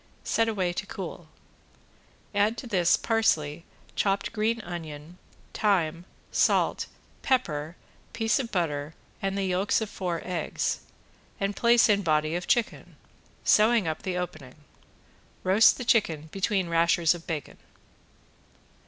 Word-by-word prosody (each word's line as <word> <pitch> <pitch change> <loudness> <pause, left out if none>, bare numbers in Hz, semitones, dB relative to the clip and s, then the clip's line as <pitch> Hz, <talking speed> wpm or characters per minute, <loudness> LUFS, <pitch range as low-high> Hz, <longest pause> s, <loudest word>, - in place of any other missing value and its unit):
Set 225 0 +1
away 185 -5 -1
to - - -5
cool. - - -7 1.0
Add 205 +3 +2
to 240 - -6
this 185 -7 +3
parsley, 165 -9 0 0.3
chopped 195 +1 0
green 225 +1 0
onion, 165 -2 -8 0.3
thyme, 175 -5 +1 0.3
salt, - - +2 0.3
pepper, 165 - 0 0.4
piece 225 +1 +1
of 240 -4 -4
butter 155 -5 -2 0.3
and 195 0 -1
the 200 - 0
yolks 190 +2 +1
of 220 -2 -4
four 175 -3 -3
eggs, 175 -4 -2 0.6
and 195 0 -1
place 235 +2 +5
in 205 -2 +3
body 155 -3 +1
of 175 0 -4
chicken, 240 -3 0 0.5
sewing 215 -3 +4
up 155 - -3
the 185 -1 -3
opening. 155 -7 -6 0.9
Roast 195 +4 +5
the 250 - -5
chicken 160 -10 +1
between 195 -1 0
rashers 170 0 +3
of 170 -1 -10
bacon. 155 -3 -5
185 Hz, 125 wpm, -27 LUFS, 165-215 Hz, 1.0 s, place